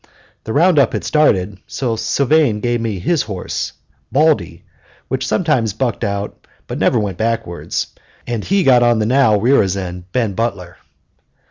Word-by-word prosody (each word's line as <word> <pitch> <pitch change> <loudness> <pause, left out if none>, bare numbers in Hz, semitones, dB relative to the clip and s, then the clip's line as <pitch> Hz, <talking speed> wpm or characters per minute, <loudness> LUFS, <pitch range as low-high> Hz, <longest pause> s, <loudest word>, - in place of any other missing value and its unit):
The 110 - -4
round 170 +1 +4
up 135 - +3
had - - -2
started; 105 -10 +1
so 125 -4 -2
Sylvane 140 -1 +2
gave 120 +1 -1
me 110 -4 -2
his 150 - 0
horse, 100 -4 -4 0.4
Baldy, 140 - +1 0.5
which 130 0 -2
sometimes 140 - +1
bucked 120 +1 -2
but 100 0 -5
never - - +2
went 100 -5 -2
over 115 - +2
backwards, 85 -7 -4 0.3
and 115 -3 -3
he 195 0 +1
got 125 -3 +5
on 120 -1 +4
the 110 - 0
now 125 -2 +4
rearisen 95 -7 +1
Ben 115 -5 0
Butler. 95 -5 -3
115 Hz, 150 wpm, -17 LUFS, 100-135 Hz, 0.5 s, got